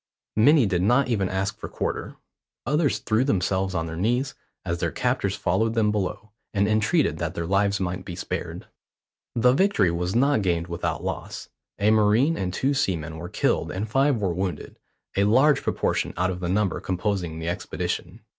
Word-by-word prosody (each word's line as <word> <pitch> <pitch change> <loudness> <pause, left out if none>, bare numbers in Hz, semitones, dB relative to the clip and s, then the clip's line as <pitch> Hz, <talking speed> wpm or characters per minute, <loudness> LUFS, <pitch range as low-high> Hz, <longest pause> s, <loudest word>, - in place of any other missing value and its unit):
Many 140 +4 +5
did 90 -3 0
not 125 +7 +3
even 100 -6 0
ask 95 +1 -2
for - - -6
quarter. - - -3 0.5
Others 150 +3 +1
threw 110 +2 +1
themselves 95 -5 0
on 80 0 0
their 80 0 -5
knees, 120 +9 0 0.3
as 85 0 -2
their - - 0
captors - - 0
followed 115 +1 0
them 105 -2 +3
below, 105 +1 -3 0.2
and 100 +1 +3
entreated 110 - +2
that 85 +1 -3
their 85 - -2
lives 100 +2 +1
might 90 0 -3
be 90 - -7
spared. - - -5 0.7
The 125 +1 +4
victory 135 - +3
was 90 +3 -2
not 140 0 +3
gained 85 -3 0
without 85 0 -3
loss. - - -5 0.3
A 105 +2 +3
marine 110 +9 +4
and 90 - -2
two 135 +9 0
seamen 85 - -1
were 85 +2 -7
killed - - 0
and 100 +4 -3
five 135 +4 +2
were 95 -5 -1
wounded, 90 -3 -4 0.4
a 100 - +3
large 135 +8 +4
proportion - - -1
out 90 +2 +1
of 90 - -5
the 90 -1 -3
number 100 -1 +1
composing 90 -3 -2
the 80 +1 -3
expedition. 90 +3 -4
100 Hz, 180 wpm, -25 LUFS, 90-115 Hz, 0.7 s, Many